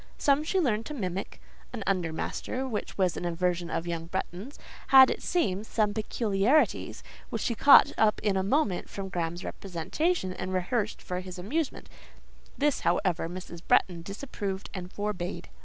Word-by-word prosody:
Some 285 Hz, +1 st, +3 dB
she 375 Hz, +5 st, 0 dB
learned 230 Hz, -9 st, 0 dB
to 300 Hz, -, -5 dB
mimic: 190 Hz, -5 st, -4 dB, 0.3 s
an 235 Hz, -5 st, -5 dB
under 180 Hz, -4 st, 0 dB
master, 205 Hz, +9 st, -3 dB
who 220 Hz, -5 st, -1 dB, 0.2 s
was 185 Hz, -3 st, +2 dB
an -, -, -5 dB
aversion 175 Hz, 0 st, -1 dB
of 165 Hz, -, -2 dB
young 165 Hz, -1 st, -4 dB
Bretton's, 190 Hz, -, -5 dB, 0.3 s
had, 265 Hz, -1 st, +8 dB
it -, -, -4 dB
seems, 220 Hz, -, 0 dB
some 210 Hz, -2 st, +1 dB
peculiarities, 220 Hz, +5 st, +1 dB, 0.3 s
which -, -, -3 dB
she 235 Hz, -, 0 dB
caught 275 Hz, +5 st, +7 dB
up 215 Hz, -1 st, +4 dB
in 205 Hz, -2 st, +2 dB
a 190 Hz, -, +2 dB
moment 200 Hz, -, 0 dB
from 195 Hz, -1 st, -6 dB
Graham's 175 Hz, 0 st, -3 dB
representation, 190 Hz, -, -2 dB
and 185 Hz, 0 st, -4 dB
rehearsed 210 Hz, +4 st, -1 dB
for 180 Hz, 0 st, -3 dB
his 185 Hz, 0 st, -8 dB
amusement; 275 Hz, -, -3 dB, 0.7 s
this, 290 Hz, 0 st, +2 dB
however, 175 Hz, -1 st, 0 dB
Mrs. 175 Hz, -1 st, -8 dB
Bretton 175 Hz, -3 st, +3 dB
disapproved 200 Hz, 0 st, -5 dB
and 180 Hz, -1 st, -6 dB
forbade. 185 Hz, -4 st, -4 dB
195 Hz, 160 wpm, -28 LUFS, 180-235 Hz, 0.7 s, had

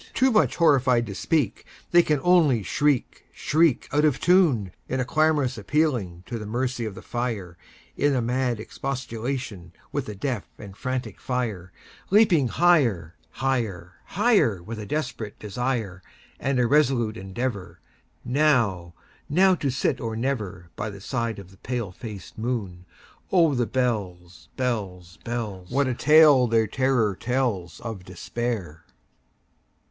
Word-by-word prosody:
Too 260 Hz, 0 st, +4 dB
much 215 Hz, -, +3 dB
horrified 130 Hz, -7 st, +3 dB
to 100 Hz, -, -6 dB
speak, 135 Hz, +1 st, 0 dB, 0.3 s
They 175 Hz, -, +7 dB
can 150 Hz, -4 st, +1 dB
only 160 Hz, -, +4 dB
shriek, 145 Hz, -, 0 dB
shriek, 155 Hz, -3 st, +2 dB
Out 150 Hz, +1 st, +2 dB
of 150 Hz, -4 st, +2 dB
tune, 155 Hz, -, +3 dB, 0.2 s
In 130 Hz, -, -1 dB
a 125 Hz, -, 0 dB
clamorous 150 Hz, -4 st, +1 dB
appealing 105 Hz, -, 0 dB
to 115 Hz, +1 st, -5 dB
the 105 Hz, -, -7 dB
mercy 125 Hz, +1 st, -2 dB
of 105 Hz, -3 st, -5 dB
the -, -, -10 dB
fire, 110 Hz, -8 st, -4 dB, 0.4 s
In 145 Hz, 0 st, +2 dB
a -, -, +2 dB
mad 125 Hz, -1 st, 0 dB
expostulation 120 Hz, -6 st, -5 dB, 0.2 s
with -, -, -3 dB
the 105 Hz, -, -6 dB
deaf 120 Hz, 0 st, -3 dB
and 100 Hz, -3 st, -10 dB
frantic 130 Hz, +3 st, -4 dB
fire, 110 Hz, -9 st, -3 dB, 0.4 s
Leaping 190 Hz, -, +4 dB
higher, 115 Hz, -, +2 dB, 0.3 s
higher, 105 Hz, -10 st, -1 dB
higher, 195 Hz, -, +2 dB
With 110 Hz, +4 st, -7 dB
a 105 Hz, -, -7 dB
desperate 130 Hz, -8 st, -4 dB
desire, 110 Hz, -3 st, -3 dB, 0.4 s
And 135 Hz, -1 st, 0 dB
a 125 Hz, -, +3 dB
resolute 120 Hz, -5 st, +2 dB
endeavorNow—now 110 Hz, -, -2 dB, 0.6 s
to 145 Hz, -5 st, -2 dB
sit 130 Hz, +2 st, -1 dB
or 115 Hz, -2 st, -3 dB
never, 110 Hz, -9 st, -3 dB
By 105 Hz, -, -3 dB
the 100 Hz, -1 st, -9 dB
side 115 Hz, +1 st, -3 dB
of 95 Hz, -2 st, -11 dB
the 95 Hz, -, -18 dB
pale 120 Hz, -2 st, -4 dB
faced 105 Hz, 0 st, -9 dB
moon. 100 Hz, -7 st, -4 dB, 0.4 s
Oh, 165 Hz, -5 st, +4 dB
the 120 Hz, -3 st, 0 dB
bells, 90 Hz, -, -3 dB
bells, 95 Hz, -9 st, -3 dB
bells! 105 Hz, -7 st, -5 dB
What 140 Hz, +2 st, +1 dB
a 130 Hz, -, 0 dB
tale 150 Hz, -2 st, +6 dB
their 115 Hz, -1 st, +3 dB
terror 120 Hz, -3 st, +1 dB
tellsOf 115 Hz, -4 st, -3 dB
Despair! 95 Hz, -2 st, -4 dB
120 Hz, 140 wpm, -25 LUFS, 100-135 Hz, 0.6 s, They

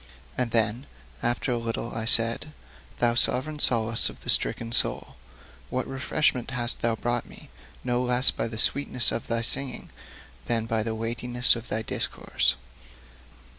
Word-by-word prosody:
And 125 Hz, -, -2 dB
then 115 Hz, +3 st, 0 dB, 0.3 s
after 120 Hz, +2 st, -2 dB
a 120 Hz, -, -2 dB
little 115 Hz, 0 st, -5 dB
I 110 Hz, 0 st, -4 dB
said: 115 Hz, +6 st, +2 dB, 0.4 s
'Thou 120 Hz, -1 st, +2 dB
sovereign 130 Hz, +5 st, -1 dB
solace 115 Hz, -4 st, +4 dB
of -, -, -14 dB
the -, -, +3 dB
stricken 115 Hz, -1 st, +4 dB
soul, -, -, +1 dB, 0.5 s
what 130 Hz, -, -3 dB
refreshment 130 Hz, -1 st, -2 dB
hast 125 Hz, -2 st, 0 dB
thou 115 Hz, -1 st, 0 dB
brought 120 Hz, +1 st, -3 dB
me, -, -, -15 dB, 0.3 s
no 125 Hz, 0 st, -1 dB
less 125 Hz, +1 st, +4 dB
by -, -, -4 dB
the 110 Hz, -1 st, -7 dB
sweetness 125 Hz, 0 st, +2 dB
of 115 Hz, -, -5 dB
thy 115 Hz, 0 st, -1 dB
singing 135 Hz, +3 st, -2 dB, 0.6 s
than 115 Hz, -2 st, 0 dB
by 115 Hz, -1 st, -2 dB
the 110 Hz, 0 st, -3 dB
weightiness 120 Hz, +3 st, +1 dB
of 115 Hz, 0 st, -9 dB
thy 110 Hz, -, -3 dB
discourse! -, -, -1 dB
120 Hz, 155 wpm, -25 LUFS, 115-125 Hz, 0.6 s, solace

